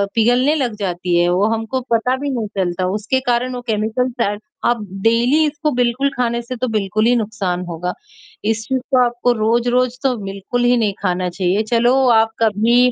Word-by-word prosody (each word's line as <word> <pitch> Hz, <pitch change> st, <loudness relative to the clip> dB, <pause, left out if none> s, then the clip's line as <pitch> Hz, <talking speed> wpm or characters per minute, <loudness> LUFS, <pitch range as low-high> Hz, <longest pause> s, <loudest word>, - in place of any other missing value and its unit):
पिघलने 245 Hz, +5 st, +3 dB
लग 255 Hz, -7 st, -1 dB
जाती 180 Hz, -2 st, -1 dB
है, 175 Hz, -, +3 dB
वो 180 Hz, +3 st, +2 dB
हमको 225 Hz, +3 st, -2 dB
पता 240 Hz, +3 st, +2 dB
भी 285 Hz, +2 st, -3 dB
नहीं 235 Hz, -5 st, -2 dB
चलता। 185 Hz, -1 st, -1 dB
उसके 225 Hz, +5 st, 0 dB
कारण 245 Hz, +1 st, +1 dB
वो 245 Hz, -, -5 dB
केमिकल 220 Hz, +4 st, 0 dB
शायद 205 Hz, -2 st, 0 dB, 0.3 s
अब 240 Hz, -2 st, 0 dB, 0.2 s
डेली 240 Hz, +7 st, +3 dB
इसको 300 Hz, +1 st, -2 dB
बिल्कुल 250 Hz, +3 st, +1 dB
खाने 235 Hz, -1 st, 0 dB
से 240 Hz, +2 st, -6 dB
तो 255 Hz, +1 st, -2 dB
बिल्कुल 215 Hz, 0 st, 0 dB
ही 245 Hz, +1 st, +4 dB
नुकसान 205 Hz, -6 st, -2 dB
होगा। 175 Hz, +2 st, -3 dB, 0.5 s
इस 220 Hz, +1 st, 0 dB
चीज 265 Hz, -1 st, 0 dB, 0.2 s
को 250 Hz, -, +5 dB
आपको 240 Hz, 0 st, 0 dB
रोज-रोज़ 240 Hz, +2 st, +1 dB
तो 260 Hz, -2 st, +2 dB
बिल्कुल 195 Hz, +5 st, -3 dB
ही 245 Hz, +1 st, +4 dB
नहीं 215 Hz, -4 st, +1 dB
खाना 180 Hz, -1 st, 0 dB
चाहिए, 185 Hz, +3 st, 0 dB
चलो 240 Hz, +2 st, +3 dB, 0.2 s
आप 225 Hz, 0 st, +1 dB
कभी 230 Hz, +4 st, +3 dB
230 Hz, 185 wpm, -18 LUFS, 205-250 Hz, 0.5 s, को